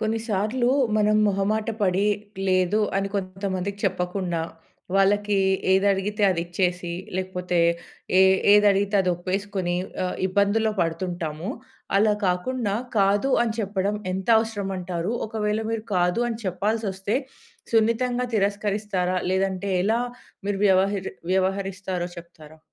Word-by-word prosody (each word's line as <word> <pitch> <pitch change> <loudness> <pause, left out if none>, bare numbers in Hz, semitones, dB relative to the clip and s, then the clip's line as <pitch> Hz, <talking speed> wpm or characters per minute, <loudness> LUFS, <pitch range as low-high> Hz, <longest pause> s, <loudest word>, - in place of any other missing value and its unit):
కొన్నిసార్లు 220 +2 0 0.3
మనం 215 0 +3
మొహమాట 205 +3 0
పడి, 190 0 +2 0.4
లేదు 185 +3 +2 0.2
అని 195 0 0
కొంతమందికి 190 0 -3
చెప్పకుండా 180 -2 -1 0.5
వాళ్ళకీ 205 +1 +3 0.3
ఏది 190 +1 +3
అడిగితే 205 +2 -2
అది 175 -2 0
ఇచ్చేసి, 180 0 -1 0.2
లేకపోతే 180 -1 -2 0.6
ఏ - - +7 0.3
ఏది 210 0 +6
అడిగితే 200 +1 0
అది 185 -1 +1
ఒప్పేసుకొని 185 0 -2 0.3
ఆహ్, 180 - -3
ఇబ్బందులో 205 +3 +2
పడుతుంటాము. 165 +1 -3 0.5
అలా 210 +1 +4
కాకుండా, 200 +4 -1 0.2
కాదు 200 +6 +3
అని 230 -2 0
చెప్పడం 200 0 -1 0.2
ఎంత 190 +2 -4
అవసరం 220 -3 -3
అంటారు. 180 +2 -3
ఒకవేళ 215 0 -1
మీరు 225 -1 -3
కాదు 180 +6 +2
అని 230 -2 -4
చెప్పాల్సొస్తే 200 +2 -1 0.6
సున్నితంగా 240 +2 +2
తిరస్కరిస్తారా? 200 -2 0
లేదంటే 190 +1 -1
ఎలా 220 +4 +2 0.5
మీరు 200 -1 -1
వ్యవహరి 195 0 +2 0.2
వ్యవహరిస్తారో 190 -1 -1
చెప్తారా? 160 -2 -13
195 Hz, 115 wpm, -24 LUFS, 185-210 Hz, 0.6 s, ఏ